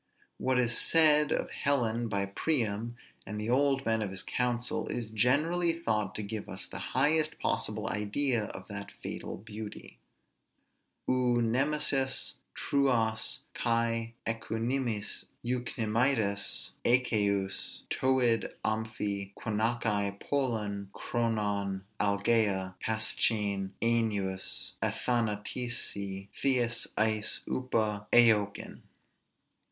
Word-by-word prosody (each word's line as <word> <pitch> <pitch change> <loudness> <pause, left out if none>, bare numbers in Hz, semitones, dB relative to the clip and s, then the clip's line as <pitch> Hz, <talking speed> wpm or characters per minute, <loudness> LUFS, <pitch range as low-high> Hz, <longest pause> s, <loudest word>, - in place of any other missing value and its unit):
What 130 -1 +1
is 120 -2 +3
said 150 -2 +5
of - - -1
Helen 120 -4 +1
by 100 -2 0
Priam 115 0 0 0.3
and 105 +1 -4
the 110 +2 -1
old 135 +1 +2
men 115 0 +1
of 105 - -2
his 95 0 -1
council, 120 -1 -1
is 115 -3 -4
generally 155 +10 +2
thought 110 - -1
to 105 - -3
give 105 +1 -5
us - - -6
the - - -7 0.2
highest 155 0 +3
possible 110 +1 -1
idea 110 +3 0
of - - -8
that - - -6
fatal - - -5
beauty. 105 0 -9 1.1
[Greek: - - +2
Ou 125 -1 +2
nemesis, 135 +2 +1 0.2
Trôas 115 -6 +1
kai 115 0 0
euknêmidas 115 0 -2 0.2
'Achaious 110 -3 0
Toiêd' 125 -3 +2
amphi 105 -3 -2
gunaiki 110 -2 0
polun 105 -8 -1
chronon 105 -4 -1 0.2
algea 100 -2 +2
paschein 105 -3 0
Ainôs 105 -5 0
athanatêsi 105 -4 -1
theês 120 -3 +1
eis 110 -1 +2
ôpa 110 -5 -1
eoiken. 110 -4 +3
115 Hz, 95 wpm, -30 LUFS, 105-125 Hz, 1.1 s, said